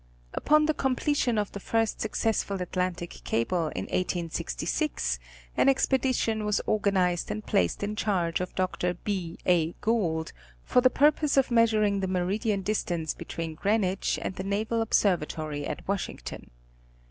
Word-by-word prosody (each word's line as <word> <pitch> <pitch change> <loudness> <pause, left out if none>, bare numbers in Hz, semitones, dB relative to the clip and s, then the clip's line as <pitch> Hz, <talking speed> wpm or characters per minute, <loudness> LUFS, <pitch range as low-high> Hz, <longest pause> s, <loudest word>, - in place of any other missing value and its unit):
Upon 305 +1 +4
the 310 - +2
completion 265 -3 +1
of 205 -1 0
the 200 - -6
first 225 +2 0
successful 220 -2 0
Atlantic 180 -1 -3
cable 160 +9 0
in - - -2
1866, - - -1 0.4
an - - +4
expedition 255 -5 +1
was 210 -1 +1
organized 190 -4 +1
and 210 0 -4
placed 85 - +1
in 210 +1 -2
charge 180 -6 0
of 180 - -5
Dr. 180 -1 0
B. 180 -2 -3
A. 170 -2 +3
Gould, 175 -8 -1 0.3
for 250 - +3
the 255 - +6
purpose 295 +1 +3
of 270 -2 +3
measuring 215 -3 +3
the 190 - -1
meridian 195 +3 0
distance 175 -6 -1
between 165 -1 -5
Greenwich 195 +2 0
and 185 - -3
the 190 - -3
Naval 215 +4 0
Observatory 155 -8 0
at - - -6
Washington. 200 -1 -4
195 Hz, 140 wpm, -28 LUFS, 175-225 Hz, 0.4 s, the